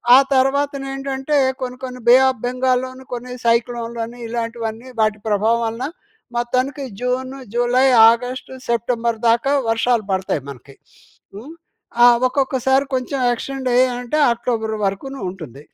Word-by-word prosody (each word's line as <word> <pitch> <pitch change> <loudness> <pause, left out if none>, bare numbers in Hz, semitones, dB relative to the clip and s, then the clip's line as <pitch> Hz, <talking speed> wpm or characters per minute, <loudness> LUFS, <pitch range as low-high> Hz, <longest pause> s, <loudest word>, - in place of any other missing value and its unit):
ఆ - - +9 0.2
తర్వాతనేంటంటే, 270 +1 0 0.2
కొన్ని, 250 0 -4
కొన్ని 250 -1 -8
బే 245 - +9
ఆఫ్ 255 -3 -5
బెంగాల్లోని, 255 +1 -1
కొన్ని 250 +1 -7
సైక్లోన్‍లని, 235 0 -1
ఇలాంటివన్నీ 230 +1 -4
వాటి 215 -1 +1
ప్రభావం 220 +3 +2
వలన 230 +3 -3 0.5
మొత్తానికి 255 +4 -1 0.2
జూను, 255 +2 -2 0.2
జులై, 245 +2 +3 0.2
ఆగస్టు, 250 +3 -4 0.2
సెప్టెంబర్ 235 -1 0
దాకా 235 +5 +2 0.2
వర్షాలు 225 0 +1
పడతాయి 190 -5 -1
మనకి. 135 0 -12 0.6
హ్మ్. 235 +10 -9 0.5
ఆహ్, 240 0 +7
ఒక్కొక్కసారి 265 0 +1
కొంచం 260 +2 -2
ఎక్స్టెండయ్యాయంటే, 250 0 0 0.2
అక్టోబరు 225 -2 -2
వరకును 265 +8 -4
ఉంటుంది. 155 -7 -10
245 Hz, 115 wpm, -20 LUFS, 230-260 Hz, 0.6 s, ఆ